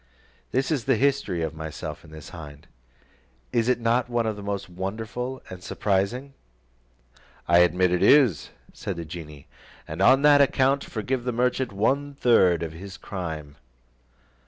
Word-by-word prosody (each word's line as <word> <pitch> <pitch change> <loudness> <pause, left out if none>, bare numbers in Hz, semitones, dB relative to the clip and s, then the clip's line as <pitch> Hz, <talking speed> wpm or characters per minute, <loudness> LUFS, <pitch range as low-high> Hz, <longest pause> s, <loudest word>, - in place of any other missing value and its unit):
"This 135 +4 0
is 135 -6 -1
the 135 -2 +3
history 130 -9 0
of 80 -1 -3
myself 80 0 -7
and 80 - -15
this 80 -1 -10
hind: 75 -3 -11 0.9
is 115 +1 +2
it 125 - +2
not 120 +1 +1
one 120 -1 0
of 110 -1 -1
the 100 - -9
most 100 0 -4
wonderful 110 +8 -5
and 90 -1 -9
surprising?" 105 +9 -1 1.1
"I 85 +1 +5
admit 90 +1 +3
it 90 - +1
is," 125 - +4 0.2
said 100 - -5
the 85 -1 -6
genie, 75 -3 -9 0.4
"and 80 +4 -5
on 130 +7 +5
that 145 -1 +7
account 135 0 +2
forgive 120 +3 -3
the 125 - -1
merchant 125 +1 0
one 140 +8 0
third 95 - +4
of 80 -1 -5
his 95 +3 -9
crime." 80 -6 -6
100 Hz, 155 wpm, -25 LUFS, 85-125 Hz, 1.1 s, that